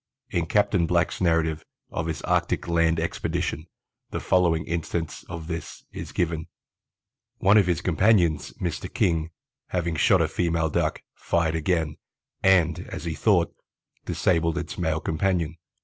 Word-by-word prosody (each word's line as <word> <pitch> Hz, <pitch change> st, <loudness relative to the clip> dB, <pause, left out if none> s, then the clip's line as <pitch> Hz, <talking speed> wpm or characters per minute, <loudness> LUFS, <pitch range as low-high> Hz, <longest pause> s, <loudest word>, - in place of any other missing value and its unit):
In 85 Hz, -1 st, 0 dB
Capt. 105 Hz, +3 st, +2 dB
Black's 85 Hz, +2 st, +1 dB
narrative 80 Hz, -2 st, +1 dB, 0.3 s
of 80 Hz, -, -2 dB
his 80 Hz, -2 st, -4 dB
Arctic -, -, 0 dB
land 85 Hz, -1 st, +2 dB
expedition 80 Hz, -1 st, -2 dB, 0.4 s
the -, -, -3 dB
following 85 Hz, -3 st, +2 dB
instance 85 Hz, -1 st, -3 dB
of 85 Hz, -2 st, -6 dB
this 80 Hz, 0 st, -6 dB
is -, -, -7 dB
given: 80 Hz, -2 st, -1 dB, 0.9 s
"One 100 Hz, +2 st, +4 dB
of 100 Hz, -4 st, +5 dB
his 85 Hz, -4 st, +1 dB
companions, 90 Hz, -3 st, +3 dB
Mr. 85 Hz, -4 st, -4 dB
King, 80 Hz, -2 st, +1 dB, 0.4 s
having 85 Hz, -2 st, -1 dB
shot 75 Hz, -, +4 dB
a -, -, +3 dB
female 85 Hz, -2 st, 0 dB
Duck, -, -, 0 dB
fired 85 Hz, -2 st, 0 dB
again, 80 Hz, -1 st, 0 dB, 0.4 s
and, 90 Hz, -4 st, +4 dB
as 75 Hz, -, -6 dB
he 80 Hz, -, -2 dB
thought, 90 Hz, 0 st, +2 dB, 0.5 s
disabled 85 Hz, -1 st, +1 dB
its 85 Hz, -3 st, -4 dB
male 80 Hz, -3 st, -1 dB
companion. 85 Hz, -1 st, 0 dB
85 Hz, 140 wpm, -25 LUFS, 80-90 Hz, 0.9 s, of